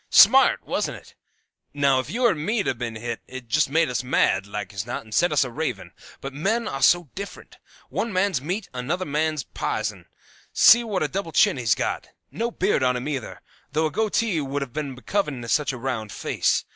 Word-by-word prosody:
Smart, - - +6
wasn't - - -2
it? - - -17 0.6
Now, 140 -2 +3
if 130 +1 -4
you 240 +8 0
or 235 - +5
me'd 200 +7 -1
'a' - - +2
ben 115 -2 -5
hit, 115 +1 -5
it'd 130 -2 -9
just 150 +5 +2
made 160 +3 +3
us 125 0 -2
mad, 100 -6 +2
like 100 -1 -6
as 100 - -3
not, 120 - -4
and 110 -1 -12
set 175 +7 +3
us 150 - +3
a 125 - -5
ravin'. 125 -7 -4 0.3
But 135 0 -6
men 215 +11 0
are 135 - -4
so 175 -4 +4
different. 200 +1 -9 0.3
One 230 - -2
man's 185 -6 +1
meat's 180 +8 -3
another 155 +9 -2
man's 155 0 -1
pison. 105 -8 -4 0.5
See 235 +1 +7
what 205 -7 -1
a - - +1
double 180 +2 -4
chin - - +4
he's 115 -4 +2
got. - - -3 0.2
No 230 +1 -2
beard 195 - 0
on 125 -1 +2
him, 125 +3 -5
either, 135 -6 -5 0.3
though 155 +2 +2
a 155 - -1
goatee 215 -3 0
would 140 0 -2
have 125 -4 -10
been 145 -3 -4
becoming 150 -3 -2
to - - -7
such 150 +5 +1
a 130 - -6
round 115 -4 -3
face. - - 0
145 Hz, 210 wpm, -24 LUFS, 125-180 Hz, 0.6 s, See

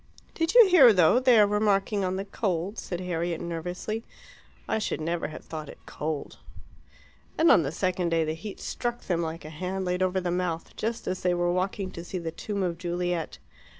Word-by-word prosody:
"Did 330 +5 -1
you 475 -4 +10
hear, 310 -10 +8
though, 185 +4 +5
they 255 -3 +5
are 210 - +7
remarking 205 -1 +1
on 185 0 -1
the 195 +1 -3
cold?" 195 0 -2
said 175 -1 -5
Harriet 170 -2 -2
nervously. 180 +6 -4 0.6
"I 220 - 0
should 215 - -2
never 165 +2 -2
have 155 - -10
thought 155 -2 -7
it - - -10
cold." 150 -1 -5 1.0
And 325 +1 +5
on - - +6
the 140 -3 -2
second 180 0 -1
day 165 -1 +2
the 155 0 -2
heat 190 +6 -8
struck 240 -1 -3
them, 175 -2 -1
like 160 -1 -5
a 155 - -8
hand 185 +4 -3
laid 180 +1 -1
over 185 0 +1
the 180 -1 -2
mouth, 175 -2 -2
just 230 +2 -3
as 185 - -3
they 180 -1 +2
were 175 0 +1
walking 185 +1 -2
to 170 - -8
see 185 - -5
the 165 -2 -4
tomb 200 +4 -3
of 170 -2 -2
Juliet. 175 -1 -2
180 Hz, 205 wpm, -27 LUFS, 170-205 Hz, 1.0 s, you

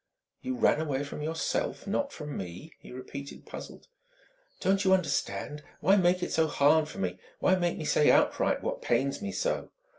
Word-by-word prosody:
"You 260 0 -3
ran 200 -9 +3
away 145 -3 -1
from 145 +1 -7
yourself 160 +2 -2
not 275 +8 -1
from 150 - -7
me?" 95 - -7
he - - -13
repeated, 140 +2 -8
puzzled. - - -9 0.7
"Don't 195 +1 +2
you 190 -1 +5
understand? 150 -3 -2 0.2
Why 195 - +5
make 180 -1 +3
it - - -2
so 160 -1 +3
hard 155 +1 +4
for - - -10
me? 90 -1 -2 0.2
Why 185 - +3
make 175 -2 +1
me 155 - -5
say 150 0 +4
outright - - +3
what - - -3
pains 135 - 0
me 205 -1 -3
so?" - - -1
155 Hz, 180 wpm, -29 LUFS, 140-190 Hz, 0.7 s, you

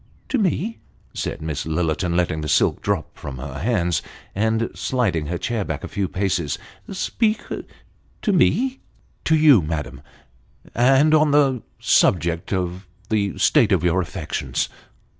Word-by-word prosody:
" - - -34
To 265 - +1
me! 210 +3 0 0.2
" - - -34
said - - -4
Miss 80 -3 -3
Lillerton, 80 +2 -1
letting 85 -3 0
the 75 - -3
silk - - +2
drop - - -2
from 65 -2 -7
her 70 +2 -6
hands, 90 -5 +1 0.3
and 110 +3 0
sliding 100 - -1
her 85 +2 -2
chair 115 +3 -2
back - - -4
a - - -4
few 100 -2 -2
paces. 90 -6 -1 0.2
" - - -14
Speak 215 +3 0 0.8
to 210 - +2
me! 255 +9 +2 0.2
" - - -35
" - - -39
To 160 - +4
you, 150 - +6
madam 75 -5 -4 0.7
and 135 +5 +4
on 155 -1 +5
the 140 -4 +3 0.2
subject 85 -2 +2
of 90 -1 -2 0.2
the 100 -2 0
state 120 -9 +4
of 90 -4 +3
your 90 +1 +2
affections." 85 - -3
95 Hz, 160 wpm, -22 LUFS, -, 0.8 s, you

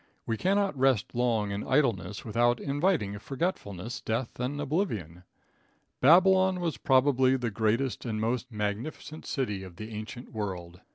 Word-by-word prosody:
We 115 - -1
cannot 195 - +1
rest 130 -5 +2
long 115 -4 +1
in 100 +1 -3
idleness 115 - 0
without 120 +2 +2
inviting 145 - 0
forgetfulness, 120 - -3
death 115 +2 -3
and 130 +4 -2
oblivion. 115 - -2 0.8
"Babylon 185 +5 +6
was 165 -8 -2
probably 130 +1 +4
the 120 -4 -3
largest 115 +4 0
and 110 -2 -2
most 125 +3 -1
magnificent 110 +9 -4
city 105 -9 -2
of 95 -2 -10
the 110 +4 -8
ancient 110 +4 -7
world." 90 -5 -5
120 Hz, 135 wpm, -29 LUFS, 105-145 Hz, 0.8 s, Babylon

